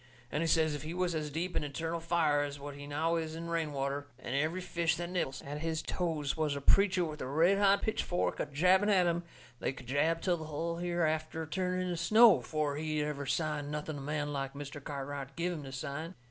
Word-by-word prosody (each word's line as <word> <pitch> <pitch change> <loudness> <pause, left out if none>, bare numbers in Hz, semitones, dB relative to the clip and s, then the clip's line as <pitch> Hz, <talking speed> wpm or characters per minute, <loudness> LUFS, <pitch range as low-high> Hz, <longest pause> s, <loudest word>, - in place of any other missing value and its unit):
And 150 - 0
he 165 - +1
says 160 -1 +3
if 145 - -4
he 160 +3 -5
was 180 -1 0
as 155 -2 -2
deep 170 +5 -3
in - - +1
eternal 160 +4 -3
fire 160 -3 +2
as 145 0 -3
what 145 +1 -6
he 145 0 -9
now 160 +3 +1
is 160 -1 -3
in 170 +1 -5
rain 165 -2 0
water, 140 +1 -2
and 130 0 -4
every 155 +6 +1
fish 170 -2 0
that 175 +1 -4
nibbles 135 -8 -2
at 145 +2 -5
his 160 0 -2
toes 160 -5 -1
was 155 -2 0
a - - -2
preacher 185 +4 +4
with 155 -1 -6
a - - -3
red 165 +8 +4
hot 200 0 +4
pitchfork 180 -4 0
a - - -1
jabbing 180 +8 +4
at 190 -3 +5
him, 170 0 +1 0.4
they - - 0
could 130 -1 -11
jab 150 +6 +2
till 175 0 +1
the 160 - -6
hull 165 +2 -3
hereafter 160 -2 -1
turned 185 +2 -1
into 180 -1 -2
snow 220 +4 +7
afore 150 -2 -2
he'd 155 -1 -1
ever 145 -2 -3
sign 150 -1 -1
nothing 150 0 -4
a - - -7
man 145 +1 -2
like 135 0 -3
Mr. 140 0 -7
Cartwright 140 -1 -5
give 175 +1 -1
him 160 - -5
to 135 - -7
sign. 155 +6 -5
155 Hz, 230 wpm, -32 LUFS, 145-170 Hz, 0.4 s, snow